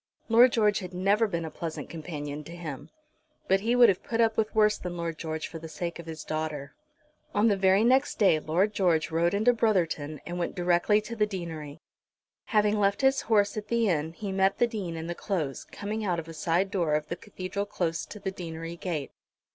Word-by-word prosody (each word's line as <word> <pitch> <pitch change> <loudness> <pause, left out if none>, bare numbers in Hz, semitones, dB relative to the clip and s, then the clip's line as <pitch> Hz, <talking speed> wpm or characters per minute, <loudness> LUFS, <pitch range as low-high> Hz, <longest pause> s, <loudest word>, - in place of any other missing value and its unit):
Lord 240 +2 +7
George 210 -3 +3
had 180 -2 -8
never 200 +5 +3
been 170 -4 -3
a 160 - -6
pleasant 160 0 -5
companion 150 -3 -6
to 170 - -9
him. 155 -6 -7 0.6
But 195 +1 +4
he 230 +4 +1
would 245 -1 +8
have 190 -3 +2
put 230 - -3
up 225 -1 +3
with 220 0 -1
worse 215 -1 +4
than 175 -1 -5
Lord 165 -2 -4
George 160 -1 -3
for 165 - -8
the 160 0 -9
sake 170 +2 -5
of 170 - -9
his 160 -1 -6
daughter. 155 -3 -4 0.6
On 215 +2 +4
the 205 - +3
very 190 +1 +4
next 260 +4 +3
day 190 -7 +4
Lord 180 +8 +1
George 170 -6 +1
rode 170 +3 +2
into 220 +4 +4
Brotherton 165 - 0
and 175 +1 -4
went 170 - -2
direct 175 +1 +1 0.2
to 230 - -5
the 210 -2 +2
deanery. 165 -6 -6 0.6
Having 210 -1 +2
left 200 +2 +2
his 270 0 +3
horse 205 -2 +3
at 210 -1 -4
the 235 -2 +2
inn 160 -1 0
he 200 +3 -5
met 190 0 +2
the 240 - +4
Dean 200 -8 -4
in 160 - -5
the 175 - -3
Close, 165 -8 -3
coming 210 +2 -5
out 180 -4 0
of 165 -1 -5
a 165 - -8
side 170 +4 0
door 170 -7 +1
of 150 0 -1
the 170 - -3
Cathedral 200 +2 -5
close 165 -5 -2
to 210 - -9
the 190 - -3
deanery 165 -2 -6
gate. 165 -6 -3
180 Hz, 220 wpm, -28 LUFS, 165-210 Hz, 0.6 s, would